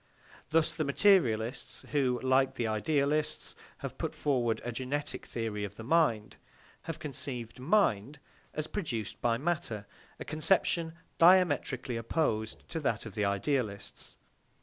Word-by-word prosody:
Thus 160 Hz, 0 st, +3 dB
the 155 Hz, -, -1 dB
materialists, 135 Hz, -, +2 dB
who, 130 Hz, -4 st, +2 dB
like 130 Hz, 0 st, +3 dB
the 120 Hz, -, -1 dB
idealists, 145 Hz, +7 st, 0 dB, 0.3 s
have -, -, -7 dB
put -, -, -3 dB
forward 120 Hz, -6 st, +1 dB
a 120 Hz, -, -2 dB
genetic 130 Hz, +5 st, -3 dB
theory 110 Hz, -3 st, -3 dB
of 100 Hz, 0 st, -5 dB
the 110 Hz, -, -8 dB
mind, 120 Hz, -7 st, +2 dB, 0.5 s
have 165 Hz, -, -3 dB
conceived 130 Hz, -6 st, -6 dB
mind 140 Hz, -, +2 dB, 0.4 s
as 155 Hz, -, -2 dB
produced 145 Hz, -, -4 dB
by 115 Hz, -1 st, +2 dB
matter; 145 Hz, -8 st, -2 dB, 0.3 s
a -, -, -6 dB
conception 160 Hz, +1 st, +1 dB, 0.3 s
diametrically 155 Hz, -8 st, +4 dB
opposed 115 Hz, -3 st, -1 dB
to 165 Hz, -, -3 dB
that 115 Hz, -7 st, -1 dB
of 110 Hz, -, -7 dB
the 105 Hz, 0 st, 0 dB
idealists. 100 Hz, +1 st, -2 dB
130 Hz, 130 wpm, -31 LUFS, 115-155 Hz, 0.5 s, diametrically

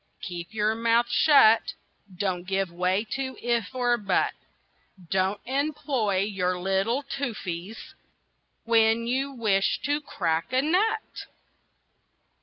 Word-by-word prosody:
"Keep 175 Hz, -2 st, -6 dB
your 215 Hz, 0 st, +1 dB
mouth 230 Hz, +1 st, +2 dB
shut, 250 Hz, -8 st, +5 dB, 0.4 s
Don't 185 Hz, -2 st, -2 dB
give 195 Hz, -2 st, -1 dB
way 180 Hz, +3 st, 0 dB
to 265 Hz, -1 st, -3 dB
'if' 235 Hz, -1 st, -1 dB
or 245 Hz, -1 st, +2 dB
'but;' 195 Hz, -3 st, +1 dB, 0.8 s
Don't 190 Hz, +2 st, +1 dB
employ 265 Hz, -7 st, -1 dB
your 185 Hz, -3 st, -1 dB
little 195 Hz, +8 st, 0 dB
toofsies 220 Hz, -8 st, -5 dB, 0.7 s
When 230 Hz, 0 st, +3 dB
you 265 Hz, +3 st, -1 dB
wish 215 Hz, -6 st, +1 dB
to 290 Hz, +1 st, 0 dB
crack 165 Hz, -, -2 dB
a 260 Hz, +1 st, +3 dB
nut!" 430 Hz, +8 st, 0 dB
220 Hz, 110 wpm, -26 LUFS, 190-260 Hz, 0.8 s, shut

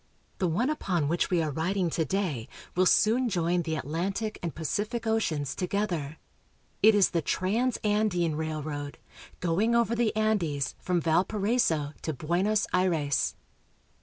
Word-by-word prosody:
The 185 Hz, -, +2 dB
one 230 Hz, -, +1 dB
upon 180 Hz, -, -1 dB
which 170 Hz, +3 st, 0 dB
we 175 Hz, -3 st, +2 dB
are 155 Hz, -, -2 dB
riding 175 Hz, +4 st, -1 dB
to 160 Hz, -, 0 dB
day 155 Hz, -, -2 dB, 0.3 s
will 185 Hz, +1 st, +4 dB
soon 235 Hz, +6 st, +3 dB
join 175 Hz, -2 st, +1 dB
the 160 Hz, -1 st, -2 dB
Atlantic 190 Hz, +9 st, -3 dB
and 170 Hz, -2 st, -4 dB
Pacific 210 Hz, -, -2 dB
oceans 155 Hz, -11 st, 0 dB
together. 180 Hz, -6 st, -2 dB, 0.6 s
It 220 Hz, 0 st, +7 dB
is 200 Hz, -2 st, +4 dB
the 170 Hz, -, +1 dB
Transandine 205 Hz, -, 0 dB
Railroad, 150 Hz, -2 st, -4 dB, 0.4 s
going 190 Hz, +7 st, +2 dB
over 235 Hz, -1 st, +2 dB
the 230 Hz, -2 st, +1 dB
Andes 185 Hz, -11 st, 0 dB
from 180 Hz, -2 st, 0 dB
Valparaiso 180 Hz, -2 st, +1 dB
to 160 Hz, -, -2 dB
Buenos 180 Hz, -, +1 dB
Aires. 165 Hz, -6 st, +1 dB
180 Hz, 135 wpm, -28 LUFS, 160-210 Hz, 0.6 s, It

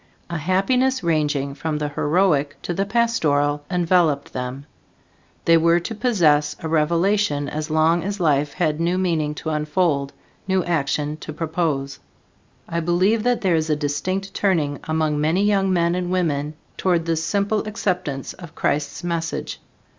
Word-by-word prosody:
A 170 Hz, -, -1 dB
happiness 220 Hz, -, +1 dB
ranging 150 Hz, -4 st, 0 dB
from 155 Hz, +1 st, -3 dB
the 150 Hz, 0 st, -2 dB
heroic 145 Hz, -1 st, +1 dB
to 175 Hz, -, -2 dB
the 195 Hz, +3 st, -1 dB
pastoral 150 Hz, -11 st, +1 dB
enveloped 175 Hz, -5 st, +1 dB
them. 125 Hz, +2 st, -5 dB, 0.8 s
They 165 Hz, 0 st, +6 dB
were 170 Hz, +1 st, +4 dB
to 200 Hz, -, -5 dB
possess 160 Hz, -11 st, +2 dB
a 160 Hz, -, -3 dB
revelation 165 Hz, 0 st, +1 dB
as 155 Hz, +1 st, -4 dB
long 160 Hz, +2 st, +3 dB
as 200 Hz, +2 st, -3 dB
life 145 Hz, -3 st, +1 dB
had 155 Hz, -4 st, 0 dB
new 175 Hz, +2 st, +1 dB
meaning 160 Hz, -5 st, 0 dB
to 160 Hz, -, -4 dB
unfold, 150 Hz, -2 st, 0 dB, 0.4 s
new 190 Hz, -1 st, +2 dB
action 150 Hz, -2 st, -1 dB
to 155 Hz, -, -8 dB
propose. 155 Hz, -4 st, -2 dB, 0.7 s
I 170 Hz, -, -2 dB
believe 180 Hz, +7 st, +2 dB
that 245 Hz, +1 st, +1 dB
there 190 Hz, -4 st, +2 dB
is 160 Hz, 0 st, 0 dB
a 150 Hz, -, +3 dB
distinct 180 Hz, +7 st, -2 dB
turning 155 Hz, -8 st, 0 dB
among 155 Hz, -2 st, 0 dB
many 165 Hz, +6 st, +2 dB
young 195 Hz, -2 st, +2 dB
men 170 Hz, -1 st, +2 dB
and 180 Hz, 0 st, -2 dB
women 155 Hz, -5 st, -1 dB, 0.2 s
toward 175 Hz, -3 st, +1 dB
this 165 Hz, -1 st, 0 dB
simple 200 Hz, +5 st, 0 dB
acceptance 180 Hz, -10 st, -2 dB
of 170 Hz, -4 st, -12 dB
Christ's 145 Hz, +2 st, -1 dB
message. 170 Hz, -1 st, -3 dB
165 Hz, 155 wpm, -22 LUFS, 150-185 Hz, 0.8 s, They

